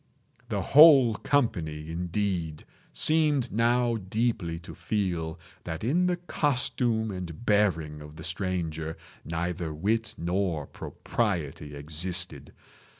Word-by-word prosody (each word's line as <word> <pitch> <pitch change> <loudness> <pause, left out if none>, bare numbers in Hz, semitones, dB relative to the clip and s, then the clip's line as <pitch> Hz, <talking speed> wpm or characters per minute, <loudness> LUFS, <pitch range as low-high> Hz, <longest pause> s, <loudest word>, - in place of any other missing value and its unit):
The 100 -4 -1
whole 140 - +8
company, 80 - -1
indeed, 90 -2 -2 0.3
seemed 150 -5 +2
now 120 +1 +2
deeply 100 -4 -1
to 85 - -10
feel 85 -7 -2 0.2
that 80 0 -5
in 170 +10 +2
the 180 -1 0
costume 125 -9 0
and 90 +1 -7
bearing 85 -9 +1
of 75 +1 -11
the 80 - -9
stranger 80 -3 -3 0.3
neither 85 +1 -3
wit 110 +9 -1
nor 85 -3 -1
propriety 80 -11 -3
existed. 85 +5 -1
95 Hz, 105 wpm, -27 LUFS, 80-115 Hz, 0.3 s, whole